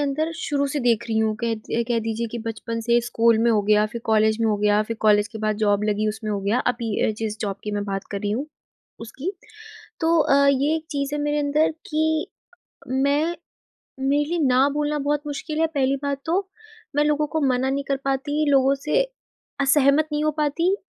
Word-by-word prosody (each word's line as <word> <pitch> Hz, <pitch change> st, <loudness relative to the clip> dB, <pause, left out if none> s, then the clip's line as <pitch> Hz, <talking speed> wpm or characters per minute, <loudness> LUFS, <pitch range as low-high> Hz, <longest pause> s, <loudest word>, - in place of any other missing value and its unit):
अंदर 305 Hz, +3 st, -1 dB
शुरू 285 Hz, -3 st, 0 dB
से 290 Hz, +1 st, -2 dB
देख 235 Hz, -1 st, +2 dB
रही 220 Hz, -1 st, 0 dB
हूँ। 220 Hz, -1 st, +1 dB
कह -, -, +1 dB, 0.2 s
ये 235 Hz, -, +1 dB
कह 240 Hz, -1 st, +1 dB
दीजिए 225 Hz, +1 st, -2 dB
कि 240 Hz, -, -5 dB
बचपन 225 Hz, +1 st, -4 dB
से, 235 Hz, +1 st, +2 dB
स्कूल 230 Hz, -1 st, +2 dB
में 235 Hz, -, +4 dB
हो 215 Hz, -2 st, +3 dB
गया, 210 Hz, +1 st, +3 dB
फिर 235 Hz, +2 st, -7 dB
कॉलेज 220 Hz, 0 st, +2 dB
में 225 Hz, -, +2 dB
हो 210 Hz, -, +1 dB
गया, 210 Hz, 0 st, +2 dB
फिर 230 Hz, +1 st, -5 dB
कॉलेज 210 Hz, 0 st, +4 dB
के 225 Hz, -1 st, -8 dB
बाद 215 Hz, -1 st, 0 dB
जॉब 205 Hz, 0 st, +2 dB
लगी, 215 Hz, 0 st, 0 dB
उसमें 215 Hz, 0 st, -4 dB
हो 205 Hz, -1 st, -1 dB
गया। 200 Hz, +5 st, +1 dB
अभी 235 Hz, -2 st, -5 dB, 0.2 s
अ, -, -, +2 dB
जिस 220 Hz, -1 st, -3 dB
जॉब 200 Hz, -2 st, -2 dB
की 210 Hz, -, -3 dB
मैं 205 Hz, -, -3 dB
बात 195 Hz, -1 st, -4 dB
कर 200 Hz, -, -3 dB
रही 205 Hz, -, -2 dB
हूँ, 250 Hz, +8 st, -2 dB, 0.5 s
उसकी। 265 Hz, -, -5 dB, 0.7 s
तो 330 Hz, 0 st, +3 dB
अ, 280 Hz, -1 st, +4 dB
ये 280 Hz, +3 st, +1 dB
एक 320 Hz, -, -6 dB
चीज़ 280 Hz, -1 st, -2 dB
है 295 Hz, -, -2 dB
मेरे 295 Hz, 0 st, 0 dB
अंदर 295 Hz, +2 st, +2 dB, 0.2 s
कि 315 Hz, 0 st, +1 dB, 0.6 s
मैं 285 Hz, +6 st, +1 dB, 0.6 s
मेरे 280 Hz, +2 st, +2 dB
लिए 345 Hz, -, 0 dB
ना 260 Hz, 0 st, +4 dB
बोलना 295 Hz, 0 st, 0 dB
बहुत 290 Hz, +1 st, 0 dB
मुश्किल 300 Hz, +2 st, -4 dB
है, 325 Hz, -, +4 dB
पहली 275 Hz, -4 st, 0 dB
बात 280 Hz, -1 st, -2 dB
तो। 375 Hz, +4 st, 0 dB, 0.5 s
मैं 295 Hz, -, +4 dB
लोगों 300 Hz, 0 st, +1 dB
को 315 Hz, +2 st, -1 dB
मना 255 Hz, +1 st, +1 dB
नहीं 280 Hz, +1 st, -2 dB
कर 275 Hz, -, +1 dB
पाती, 275 Hz, +3 st, 0 dB
लोगों 270 Hz, 0 st, +4 dB
से 300 Hz, -, +1 dB, 0.6 s
असहमत 280 Hz, +2 st, +4 dB
नहीं 300 Hz, 0 st, 0 dB
हो 305 Hz, -, +3 dB
पाती। 330 Hz, +6 st, +1 dB
270 Hz, 215 wpm, -23 LUFS, 220-295 Hz, 0.7 s, में